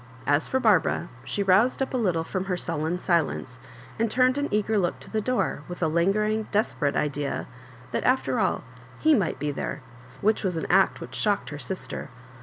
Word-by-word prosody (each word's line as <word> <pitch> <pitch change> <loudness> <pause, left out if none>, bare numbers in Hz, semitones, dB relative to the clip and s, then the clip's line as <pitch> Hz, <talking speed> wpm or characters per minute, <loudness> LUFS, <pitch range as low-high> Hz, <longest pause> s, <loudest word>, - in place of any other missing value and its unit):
As 145 +1 +2
for 260 - +1
Bar* 215 -8 +6
bara, 170 - -3
she 200 +9 -2
roused 195 +6 +4
up 270 - -2
a - - +1
little 180 -8 +1
from 185 +3 -3
her 185 -2 -1
sullen 160 +1 -2
silence, 165 -8 0 0.4
and 230 0 +2
turned 255 +4 +3
an 285 - 0
eager 210 0 +1
look 175 -3 -1
to - - -12
the 220 - 0
door, 250 - 0
with 175 0 -5
a - - +3
lingering, 210 +6 +1
desperate 185 -9 +1
idea 145 -1 -1 0.5
thati - - 0
after 255 +1 +1
all, - - +1 0.3
he 315 0 +4
might 200 - +1
be 150 0 -2
there 135 - -4 0.2
— 125 - -20
which 215 +2 +2
was 180 -4 -1
an 160 - -2
act 195 0 +4
which - - -8
shocked 205 -6 0
her 145 - -6
sister. 150 +3 -5
190 Hz, 205 wpm, -26 LUFS, 160-220 Hz, 0.5 s, Bar